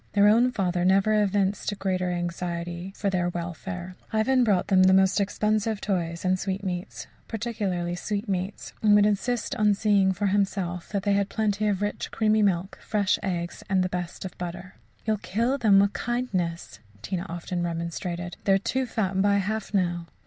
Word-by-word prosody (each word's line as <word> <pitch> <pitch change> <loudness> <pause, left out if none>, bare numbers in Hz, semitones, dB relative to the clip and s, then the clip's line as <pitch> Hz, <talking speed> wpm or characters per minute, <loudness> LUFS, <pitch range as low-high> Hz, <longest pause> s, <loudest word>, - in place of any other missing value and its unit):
Their 205 0 +5
own 235 +4 +5
father 180 -6 0
never 195 +3 +4
evinced 200 0 0
a - - -4
greater 185 -2 -1
anxiety 175 0 -3
for 200 -2 -1
their 175 -2 +1
welfare. 175 +1 -5 0.2
Ivan 245 +4 +3
brought 200 -6 +2
them 190 -1 +5
the 190 0 +6
most 190 +1 +4
expensive 215 +1 0
toys 170 -4 -2
and 185 0 +2
sweetmeats 190 -2 -4 0.2
particularly 205 -6 -2
sweetmeats 200 0 -3
and 210 -1 +5
would 205 0 +6
insist 220 +5 0
on 210 -2 +4
seeing 200 -2 +3
for 200 +2 -2
himself 190 -3 -1
that 200 -2 -2
they 205 -1 +2
had 200 0 +1
plenty 215 -1 0
of 205 -1 0
rich, 205 - -3
creamy 215 -1 +2
milk, 190 -2 0
fresh 205 -3 +1
eggs, 175 -2 -3
and 190 -1 +3
the 185 - -1
best 180 +1 -5
of 185 - -7
butter. 175 +1 -6 0.3
"You'll 220 -1 +1
kill 230 +8 -1
them 210 -5 +5
with 200 +1 +3
kindness," 190 -9 -2 0.2
Tina 185 - -3
often 175 +1 -4
remonstrated. 170 +1 -4
"They 195 - +4
are - - +5
too 255 +6 -1
fat 195 -5 0
by 200 0 +3
half 205 +2 -1
now." 175 -4 0
195 Hz, 175 wpm, -26 LUFS, 180-210 Hz, 0.3 s, the